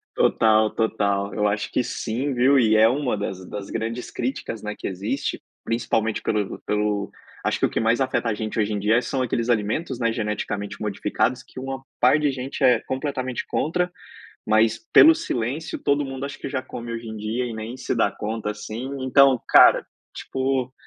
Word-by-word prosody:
Total, 110 -1 +4
total. 100 -3 0
Eu 105 - +1
acho 105 0 0
que 125 - 0
sim, 130 +6 -2
viu, 130 +3 +4
e 110 -3 +4
é 110 +1 +7
uma 125 -3 0
das 95 -1 -5
das 100 -1 -6
grandes 115 +2 -4
críticas, 120 -3 -4
né, 105 0 -3
que - - -6
existe, 105 +9 -3 0.2
principalmente 115 -1 0
pelo 105 -3 -1
pelo 105 -1 -1 0.3
acho - - 0
que - - +3
o - - 0
que - - -1
mais 115 +3 +2
afeta 130 -3 0
a - - +1
gente 110 +1 -4
hoje 105 0 +1
em 100 - -1
dia, 110 +4 +3
são 130 0 -2
aqueles 120 -1 -1
alimentos, 120 +5 0
né, 115 -1 +1
geneticamente 105 -2 -3
modificados, 105 +4 -1
que - - -11
uma 135 0 -5 0.2
par 125 +5 +5
de 150 -2 +1
gente 135 +2 -5
é 125 -3 +5
completamente 130 -2 -3
contra, 180 +3 -1 0.6
mas 110 +1 +3
pelo 325 0 +9
silêncio, 140 - -3
todo 140 0 +2
mundo 135 0 -5
acha 140 - -8
que - - -5
já 130 -1 -2
come 115 0 -7
hoje 115 0 -6
em 110 - -6
dia, 110 +4 -2
e 120 - -5
nem 110 +3 -6
se 125 - -2
dá - - +3
conta, 110 0 -3
assim, 110 +4 -6
então, 130 -1 +5
cara, - - +7 0.3
tipo, 130 -1 -2
115 Hz, 190 wpm, -23 LUFS, 105-130 Hz, 0.6 s, pelo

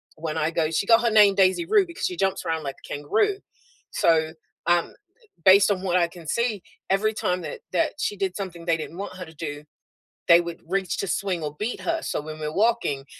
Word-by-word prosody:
when 160 0 -4
I 155 0 +1
go 160 -2 0
she 165 +5 0
got 230 +2 +5
her 235 - +2
name 210 -2 +6
Daisy 190 - +3
Rue 410 +1 +4
because 340 +2 -5
she 365 - -2
jumps 195 - -1
around 160 -1 -1
like 140 -1 -5
a - - -15
kangaroo. 215 - +1 0.5
So, 160 -1 +2 0.3
um, 175 0 +2 0.5
based 195 +1 +7
on 190 -2 -1
what 180 -2 +1
I 170 -1 +3
can 170 -1 -13
see, 235 0 -1 0.3
every 215 +3 +2
time 180 -4 -1
that 485 - -7
that 315 -2 +1
she 205 - -1
did 190 -2 -2
something 175 -4 -6
they 165 -2 +2
didn't 160 +1 -7
want 195 -1 -6
her 180 - -6
to 160 - -14
do, 145 -2 -6 0.6
they 170 0 +7
would 170 -1 -7
reach 190 0 -1
to 195 - -2
swing 180 -3 -1
or 150 0 -4
beat 220 +4 -3
her, 335 -1 -1
so - - -2
when 155 +1 -8
we're 150 0 -3
walking 210 -11 +1
185 Hz, 225 wpm, -24 LUFS, 160-210 Hz, 0.6 s, based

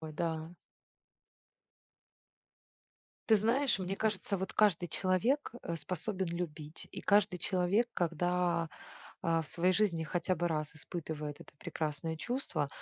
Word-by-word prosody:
Ой, 155 -1 -6
да. 160 +1 -2 2.7
Ты 225 - +8
знаешь, 230 +3 +3
мне 190 +1 -2
кажется, 200 -2 0
вот 190 +1 -3
каждый 190 -5 +4
человек, 195 - +1
э, 170 - -2
способен 185 +5 -2
любить. 160 -3 -5
И - - -5
каждый 200 -2 +4
человек, 185 +7 +2
когда, 175 0 +1 0.5
а, 165 -1 +2
в - - -10
своей 180 +4 +2
жизни 180 -5 +2
хотя 175 +3 0
бы 175 - +1
раз 155 -1 -2
испытывает 155 -2 -5
это - - -13
прекрасное 155 +1 -3
чувство, 210 - -1
175 Hz, 125 wpm, -33 LUFS, 160-195 Hz, 2.7 s, Ты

